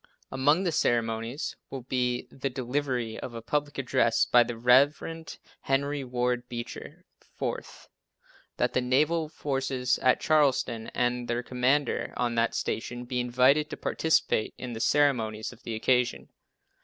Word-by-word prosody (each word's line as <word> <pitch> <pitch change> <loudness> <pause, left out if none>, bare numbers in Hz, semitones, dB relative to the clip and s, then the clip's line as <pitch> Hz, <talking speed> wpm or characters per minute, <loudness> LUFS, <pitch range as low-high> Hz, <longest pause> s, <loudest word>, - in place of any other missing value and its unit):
Among 145 +7 +3
the 175 - 0
ceremonies 115 -1 -1
will 135 -2 -6
be 125 -1 -1
the 135 0 -3
delivery 125 -2 -2
of 120 - -7
a 115 - -5
public 145 +2 -2
address 120 -3 +2
by 120 - +5
the 120 -1 -2
Rev. 140 +7 +3 0.3
Henry 140 +1 0
Ward 125 -1 -1
Beecher. 120 -1 -7 0.3
Fourth, - - -5 0.7
That - - 0
the 125 - +2
naval 150 +6 +1
forces 135 -4 -1
at 130 -1 +3
Charleston 130 -7 +2
and 125 0 0
their 120 +1 -1
Commander 130 +3 0
on 120 -1 0
that 115 0 +1
station 120 +2 -3
be 125 +1 -2
invited 130 +5 +3
to - - -6
participate 160 -8 +1
in 125 -2 -6
the 110 - -5
ceremonies 115 -6 +1
of 125 - -18
the 115 - -5
occasion. 125 +2 +1
125 Hz, 145 wpm, -28 LUFS, 120-140 Hz, 0.7 s, by